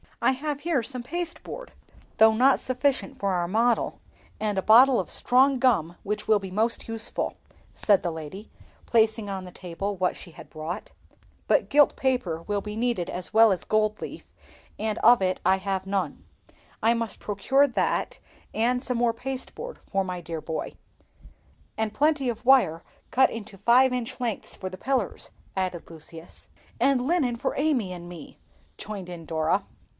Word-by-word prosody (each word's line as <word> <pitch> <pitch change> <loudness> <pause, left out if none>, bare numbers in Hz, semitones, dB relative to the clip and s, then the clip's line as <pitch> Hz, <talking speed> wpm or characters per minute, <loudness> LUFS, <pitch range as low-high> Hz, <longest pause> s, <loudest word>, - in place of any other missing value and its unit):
"I - - +3
have 285 +2 -3
here 315 -4 +1
some 255 +1 -4
pasteboard, 350 - -6 0.4
though 220 0 +7
not 260 +4 +4
sufficient 265 +1 -1
for 200 -1 0
our 175 -1 0
model, 230 +5 +1 0.4
and 210 -2 -1
a - - +2
bottle 250 +4 +7
of - - -3
strong 260 +1 +3
gum 180 -10 +2
which 210 +1 -3
will 215 - +5
be 190 -2 -8
most 220 +4 0
useful," 225 -1 -2 0.4
said 200 -3 +3
the 175 - -2
lady, 160 +6 -8 0.4
placing 220 -2 +2
on 190 -1 -4
the 180 - -10
table 185 +3 -5
what 185 -1 0
she 175 - -11
had - - -13
brought; 155 +2 -6 0.6
"but - - +2
gilt 290 0 +5
paper 195 -12 -1
will 205 +1 -2
be 210 +1 -6
needed 230 -6 -1
as 180 +3 -5
well 225 0 +7
as 185 - -1
gold 215 0 +1
leaf, - - -7 0.5
and 215 0 -1
of 240 -1 +6
it 185 -1 0
I 190 - +4
have 190 -1 -2
none; 190 -6 -2 0.6
I 225 +1 +4
must 230 -3 -3
procure 265 +8 +2
that, 250 - -1 0.3
and 245 +3 +1
some 250 -2 -2
more 235 -1 +2
pasteboard 270 - -6
for 195 0 +1
my 180 -1 -4
dear 165 -2 -5
boy." 160 -1 -4 1.0
"And 220 -1 -1
plenty 295 -1 +2
of 235 +1 -5
wire, 240 -11 +4 0.3
cut 265 +1 +5
into 215 -3 -8
five 250 +5 +4
inch 245 -1 -3
lengths 235 -4 -3
for 185 - -5
the 185 0 -10
pillars," 270 0 -1 0.3
added 185 -3 -3
Lucius. 165 +1 -11 0.3
"And 265 -2 +3
linen 290 -8 +1
for 265 +3 -2
Amy 275 -10 +1
and 175 -1 -9
me," 175 -2 -11 0.4
joined 200 -4 -7
in 170 -2 -8
Dora. 160 +5 0
220 Hz, 170 wpm, -26 LUFS, 185-255 Hz, 1.0 s, though